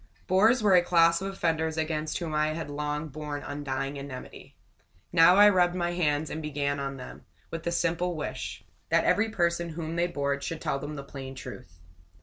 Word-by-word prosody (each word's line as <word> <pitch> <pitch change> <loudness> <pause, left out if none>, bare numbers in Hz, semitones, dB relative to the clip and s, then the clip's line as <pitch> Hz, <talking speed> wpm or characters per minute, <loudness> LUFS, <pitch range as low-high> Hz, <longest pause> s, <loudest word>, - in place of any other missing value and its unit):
Bores 215 +6 +4
were 205 -2 +5
a 180 - +7
class 170 -1 +4
of 195 0 -3
offenders 160 -4 -1
against 155 -1 -1
whom 165 -3 -4
I 155 0 +1
had 160 -3 -5
long 150 +1 -3
borne 150 0 -5
undying 140 -1 -4
enmity. 140 -2 -9 0.6
Now 175 +1 +7
I 205 +1 +8
rubbed 180 -3 +4
my 175 -1 0
hands 155 -3 0
and 160 - -4
began 140 -2 -2
on 140 0 -4
them, 125 - -10 0.3
with 165 - -4
this 170 +1 -1
simple 175 +1 0
wish: 155 - -5 0.3
That - - +3
every 220 +2 +3
person 170 -4 0
whom 165 0 -5
they 175 +1 +2
bored 140 -4 -2
should 165 0 -4
tell 140 - -1
them 150 +2 -6
the 140 - -6
plain 135 -1 -8
truth. 85 -9 -10
160 Hz, 190 wpm, -28 LUFS, 145-175 Hz, 0.6 s, I